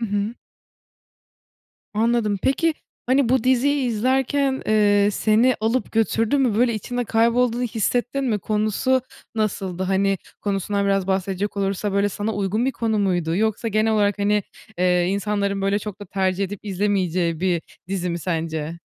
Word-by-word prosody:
Hı 230 - -1
hı. 205 +3 -2 1.6
Anladım. 220 -2 +1
Peki, 320 +4 +2 0.3
hani, 260 -1 +2
bu 260 -3 +2
diziyi 260 +2 +2
izlerken, 265 +4 +1
eee, 205 -1 +4
seni 220 +5 +3
alıp 225 +4 0
götürdü 225 +3 +1
mü? 250 -6 +2
Böyle, 240 -1 +3
içinde 245 +3 -3
kaybolduğunu 235 +2 +2
hissettin 245 +4 -1
mi? 220 -5 0
Konusu 215 +6 +1 0.3
nasıldı? 190 -4 -2
Hani, 195 +1 +1 0.2
konusundan 200 0 -1
biraz 195 -1 +1
bahsedecek 195 +1 -1
olursa, 195 +1 -1
böyle, 200 +1 +2
sana 210 +3 -3
uygun 205 +4 0
bir 270 - +1
konu 220 -3 -1
muydu? 175 -4 0
Yoksa 220 +2 0
genel 220 +1 +1
olarak, 205 -1 +1
hani, 205 0 +2 0.3
eee, 180 -1 +2
insanların, 200 0 -1
böyle, 200 +1 +1
çok 205 -1 -7
da - - -6
tercih 190 +1 0
edip 195 0 -5
izlemeyeceği 185 -4 0
bir 180 -3 +1 0.3
dizi 185 -2 -2
mi, 170 - -3
sence? 165 -1 -3
205 Hz, 150 wpm, -22 LUFS, 195-230 Hz, 1.6 s, eee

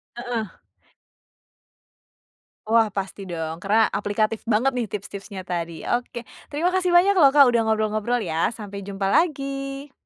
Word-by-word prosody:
Heeh. 240 -3 -4 2.1
Wah 225 0 +4
pasti 195 0 -5
dong, 165 -2 -4
karena 215 +5 +2
aplikatif 215 +2 -1
banget 230 +4 +2
nih 250 -3 -2
tips-tipsnya 200 -1 -7
tadi. 170 -2 -4
Oke, 240 0 -2 0.2
terima 325 +5 0
kasih 365 -1 +1
banyak 375 +3 +6
loh 280 -4 +6
Kak, 280 -3 +7
udah 230 -2 +1
ngobrol-ngobrol 220 +2 0
ya, 165 +4 -1
sampai 200 -3 -8
jumpa 195 -1 -2
lagi. 275 - -1
220 Hz, 130 wpm, -23 LUFS, 200-270 Hz, 2.1 s, Kak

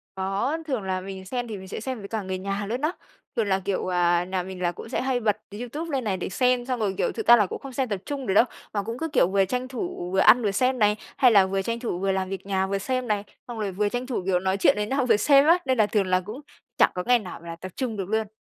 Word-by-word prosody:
Có, 195 +10 -1
thường 260 -8 -1
là 185 -1 -2
mình 190 0 -8
xem 245 +5 -3
thì 215 -3 -5
mình 190 0 -10
sẽ - - -5
xem 255 +1 -4
với 200 - -8
cả 220 0 -3
người 190 -1 -4
nhà 200 +2 -3
luôn 245 +4 -2
á. 305 - +1 0.4
Thường 225 -4 +1
là, 190 -1 +2
kiểu, 190 -1 -2
à, 175 0 +3
nhà 185 0 -2
mình 185 0 -8
là 175 -1 +1
cũng 200 - -10
sẽ - - -1
hay 260 -1 0
bật 215 -3 +1 0.2
YouTube 295 +8 -5
lên 265 -3 -1
này 195 -3 -1
để 180 - -4
xem, 250 +4 +1
xong 255 -2 -2
rồi, 200 -3 0
kiểu, - - +1
thực - - -5
ra 240 - +10
là 210 -3 +3
cũng - - -6
không 275 -2 -9
xem 260 0 0
tập 200 -3 -2
trung 280 -2 -4
được 190 - +1
đâu, 220 - +6 0.3
mà 205 -2 -1
cũng 230 +3 -5
cứ, 325 - -2
kiểu, 290 - +3
vừa 195 0 +2
tranh 250 +5 -2
thủ 255 - -5
vừa 190 - +1
ăn 240 +5 +7
vừa 205 - +1
xem 255 +5 +1
này, 210 -1 +4 0.2
hay 250 -3 +6
là 200 -3 +6
vừa 195 +1 -1
tranh 230 +4 -3
thủ 225 -7 -3
vừa 195 0 +1
làm 190 -1 -1
việc 195 0 -6
nhà 190 -1 0
vừa 195 0 -1
xem 255 +4 -2
này, 210 -2 0 0.2
xong 235 -2 -6
rồi 200 -2 -2
vừa 205 +2 0
tranh 245 +3 -3
thủ, 245 -8 -2
kiểu, 185 -2 +2
nói 190 +1 0
chuyện 195 - +5
với 210 - 0
nhau 265 0 0
vừa 225 -4 +4
xem 275 +5 +5
á, 335 +3 +6
nên 260 -1 +1
là 215 -2 +4
thường 205 -2 +1
là 185 0 +2
cũng 220 +8 -7 0.4
chẳng - - +5
có 180 - -2
ngày 245 0 +5
nào 185 -6 -9
là 170 0 -7
tập 185 +2 -9
trung 240 -5 -3
được 195 -1 -4
luôn. 220 -1 0
210 Hz, 310 wpm, -25 LUFS, 190-250 Hz, 0.4 s, ra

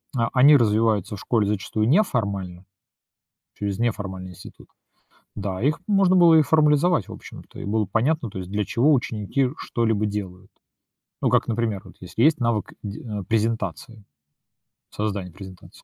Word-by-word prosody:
а, 115 -2 +1
они 140 +3 +7
развиваются 110 -3 +1
в - - -10
школе 110 -2 0
зачастую 105 +1 -1
неформально, 100 - 0 0.9
через 100 0 -3
неформальный 95 -5 -3
институт. 90 - -14 0.7
Да, 100 -1 -4
их 145 +3 +1
можно 195 -3 +3
было 170 -3 +6
и 160 - +6
формализовать 150 - +2
в - - -9
общем-то, - - -12
и - - -6
было 105 +1 0
понятно, 125 - 0
то 100 - -12
есть 90 0 -7
для 105 +1 -1
чего 140 +7 +2
ученики 125 0 0
что-либо 110 -3 -1
делают. 100 -2 -5 0.7
Ну - - +2
как, - - +2
например, 115 -4 -1
вот 90 - -14
если 90 +5 -2
есть 155 +2 +4
навык 115 -3 -1
де 100 -1 -6
н 105 -4 -5
презентации, 110 -2 -2 0.9
создания 100 -3 -4
презентации, 95 0 -13
110 Hz, 150 wpm, -23 LUFS, 100-125 Hz, 0.9 s, они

